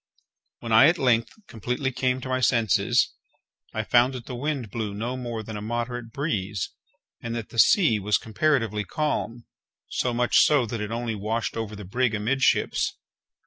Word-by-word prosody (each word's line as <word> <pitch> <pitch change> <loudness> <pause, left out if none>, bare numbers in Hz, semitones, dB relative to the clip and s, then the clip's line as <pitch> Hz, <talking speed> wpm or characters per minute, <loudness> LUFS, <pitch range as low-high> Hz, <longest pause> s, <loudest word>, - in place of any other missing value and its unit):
When 115 - -5
I 110 +6 +8
at 175 +2 +3
length 120 -5 +2 0.2
completely 125 - -3
came 130 0 -1
to 130 - -6
my 130 0 0
senses, 115 -5 +2 0.6
I - - -2
found 125 +2 +3
that 120 -2 -7
the 130 - -7
wind 130 -4 -3
blew 105 -3 -3
no 120 +5 -3
more 120 -3 -5
than 110 0 -7
a 105 - -5
moderate 120 +1 -4
breeze, 105 - -2 0.5
and 115 0 -4
that 115 -3 -5
the 115 - -4
sea 120 - +5
was 105 +1 +2
comparatively 115 -3 0
calm; 120 -4 -3 0.4
so 125 - -1
much 120 0 +2
so 145 -5 +4
that 115 -1 -4
it 105 - -3
only 115 0 -2
washed 110 +3 -2
over 110 -2 -4
the 105 -1 -9
brig 120 +4 0
amidships. 120 +6 +1
115 Hz, 175 wpm, -25 LUFS, 110-130 Hz, 0.6 s, I